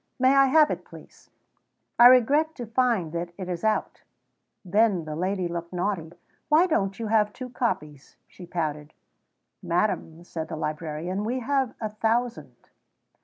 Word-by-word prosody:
May 260 Hz, +1 st, +4 dB
I 275 Hz, 0 st, +6 dB
have 300 Hz, +2 st, +5 dB
it, -, -, -4 dB
please?" -, -, -16 dB, 0.7 s
"I 240 Hz, -, +11 dB
regret 280 Hz, +6 st, +4 dB
to 245 Hz, -, -6 dB
find 230 Hz, -7 st, 0 dB
that 170 Hz, +1 st, -4 dB
it 185 Hz, -2 st, -6 dB
is 175 Hz, -2 st, -4 dB
out." 220 Hz, 0 st, -1 dB, 0.6 s
Then 200 Hz, -2 st, +2 dB
the 155 Hz, -1 st, -5 dB
lady 185 Hz, +2 st, -1 dB
looked 170 Hz, 0 st, -5 dB
naughty. 175 Hz, -3 st, -2 dB, 0.4 s
"Why 310 Hz, +4 st, +5 dB
don't 195 Hz, -, 0 dB
you 230 Hz, -, -4 dB
have 210 Hz, -1 st, +2 dB
two 250 Hz, +2 st, -8 dB
copies?" 150 Hz, -, -3 dB
she 180 Hz, -, -13 dB
pouted. 150 Hz, -3 st, -4 dB, 0.7 s
"Madam," 170 Hz, -2 st, -1 dB
said 165 Hz, -2 st, -6 dB
the 165 Hz, -, -5 dB
librarian, 155 Hz, +4 st, -4 dB
"we 250 Hz, +4 st, -2 dB
have 265 Hz, -1 st, 0 dB
a 215 Hz, -, -3 dB
thousand." 230 Hz, +3 st, -2 dB
200 Hz, 155 wpm, -26 LUFS, 170-245 Hz, 0.7 s, I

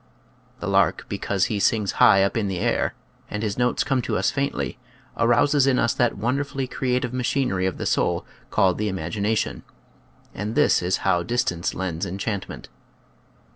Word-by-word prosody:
The -, -, -3 dB
lark, -, -, +2 dB
because 95 Hz, -2 st, 0 dB
he 105 Hz, -, -2 dB
"sings 105 Hz, 0 st, +2 dB
high 95 Hz, 0 st, +7 dB
up 100 Hz, -, 0 dB
in 110 Hz, -3 st, 0 dB
the 95 Hz, -2 st, -2 dB
air," -, -, 0 dB, 0.3 s
and 105 Hz, +1 st, -4 dB
his 105 Hz, -2 st, -1 dB
notes 125 Hz, 0 st, +1 dB
come 135 Hz, -3 st, 0 dB
to -, -, -1 dB
us -, -, +1 dB
faintly, 140 Hz, -2 st, -2 dB, 0.4 s
arouses 130 Hz, +4 st, +3 dB
in 130 Hz, -2 st, +3 dB
us 115 Hz, -, +2 dB
that 120 Hz, -4 st, +1 dB
wonderfully 135 Hz, +5 st, -1 dB
crea 125 Hz, -1 st, -1 dB
tive 125 Hz, -1 st, -4 dB
machinery 125 Hz, -7 st, 0 dB
of 95 Hz, -, -3 dB
the -, -, -4 dB
soul -, -, 0 dB, 0.2 s
called 95 Hz, -1 st, +2 dB
the 105 Hz, -1 st, 0 dB
imagina 100 Hz, +5 st, -1 dB
tion; -, -, -2 dB, 0.7 s
and 105 Hz, +2 st, -4 dB
this -, -, +4 dB
is 90 Hz, +1 st, +1 dB
how 90 Hz, -3 st, +3 dB
"distance 115 Hz, -5 st, -1 dB
lends 90 Hz, -3 st, -3 dB
en 95 Hz, -, -5 dB
chantment." 100 Hz, -1 st, -4 dB
110 Hz, 175 wpm, -24 LUFS, 95-125 Hz, 0.7 s, high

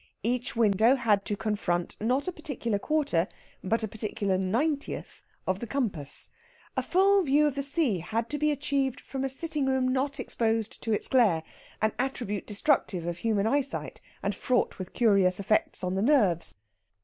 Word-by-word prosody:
Each 245 Hz, +2 st, -1 dB
window 225 Hz, +2 st, +4 dB
had 215 Hz, -6 st, +2 dB
to 205 Hz, -, -1 dB
confront, 185 Hz, -5 st, -1 dB
not 255 Hz, -, +1 dB
a -, -, 0 dB
particular 250 Hz, -, -3 dB
quarter, 275 Hz, -, +1 dB, 0.4 s
but 225 Hz, +4 st, 0 dB
a -, -, 0 dB
particular 210 Hz, -2 st, -2 dB
ninetieth, 250 Hz, +11 st, -1 dB, 0.2 s
of 185 Hz, 0 st, 0 dB
the 235 Hz, -, -5 dB
compass. 200 Hz, -, -3 dB, 0.4 s
A -, -, +1 dB
full 390 Hz, +2 st, +4 dB
view 295 Hz, -2 st, +3 dB
of 295 Hz, -, +1 dB
the 280 Hz, -, -2 dB
sea 280 Hz, -, +1 dB
had 225 Hz, +7 st, -2 dB
to 295 Hz, -, -2 dB
be 300 Hz, +1 st, +2 dB
achieved 280 Hz, -3 st, 0 dB
from 270 Hz, -1 st, -5 dB
a 270 Hz, -, 0 dB
sitting 295 Hz, 0 st, -1 dB
room 265 Hz, -1 st, +2 dB
not 275 Hz, +2 st, -1 dB
exposed 225 Hz, -3 st, -1 dB
to 225 Hz, -, -2 dB
its 210 Hz, -, 0 dB
glare, 210 Hz, -11 st, +3 dB, 0.4 s
an 220 Hz, -, +3 dB
attribute 245 Hz, -6 st, -2 dB
destructive 205 Hz, -, +1 dB
of 175 Hz, 0 st, -3 dB
human 215 Hz, -2 st, +1 dB
eyesight, 275 Hz, +3 st, -1 dB, 0.2 s
and -, -, 0 dB
fraught 250 Hz, -5 st, 0 dB
with 185 Hz, 0 st, -7 dB
curious 195 Hz, -5 st, +3 dB
effects 200 Hz, 0 st, 0 dB
on 180 Hz, 0 st, -1 dB
the 190 Hz, -, 0 dB
nerves. 210 Hz, -, +2 dB
230 Hz, 175 wpm, -28 LUFS, 200-275 Hz, 0.4 s, window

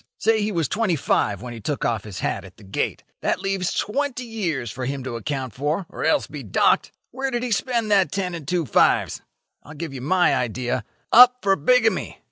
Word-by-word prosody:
Say 220 Hz, +1 st, +2 dB
he 210 Hz, +1 st, 0 dB
was 165 Hz, -6 st, 0 dB
twenty 205 Hz, -5 st, 0 dB
five 100 Hz, -, 0 dB
when 120 Hz, -1 st, -6 dB
he 115 Hz, -, -8 dB
took 145 Hz, +7 st, -2 dB
off 115 Hz, -3 st, -1 dB
his 100 Hz, -3 st, -7 dB
hat -, -, -2 dB
at 95 Hz, -2 st, -14 dB
the -, -, -16 dB
gate. 95 Hz, 0 st, -3 dB, 0.2 s
That -, -, 0 dB
leaves 195 Hz, -2 st, -1 dB
twenty 255 Hz, +3 st, -1 dB
years 170 Hz, -, -3 dB
for 130 Hz, 0 st, -5 dB
him 135 Hz, 0 st, -3 dB
to 130 Hz, -2 st, -5 dB
account 130 Hz, 0 st, -4 dB
for, 150 Hz, +7 st, -1 dB
or -, -, -6 dB
else -, -, +2 dB
be -, -, -8 dB
docked. -, -, +2 dB, 0.2 s
Where 270 Hz, +1 st, -2 dB
did 240 Hz, -1 st, -2 dB
he 250 Hz, -, -3 dB
spend 225 Hz, +1 st, 0 dB
that 190 Hz, -7 st, +4 dB
ten 185 Hz, -2 st, -2 dB
and 165 Hz, -5 st, -7 dB
two 175 Hz, -1 st, 0 dB
fives? 115 Hz, -, +2 dB, 0.4 s
I'll 150 Hz, -, -12 dB
give 155 Hz, -1 st, -6 dB
you 130 Hz, -, -6 dB
my 175 Hz, +6 st, +3 dB
idea. 120 Hz, -1 st, -2 dB, 0.3 s
Up 250 Hz, +1 st, +9 dB
for 195 Hz, -1 st, +4 dB
bigamy. -, -, +2 dB
170 Hz, 215 wpm, -23 LUFS, 130-215 Hz, 0.4 s, Up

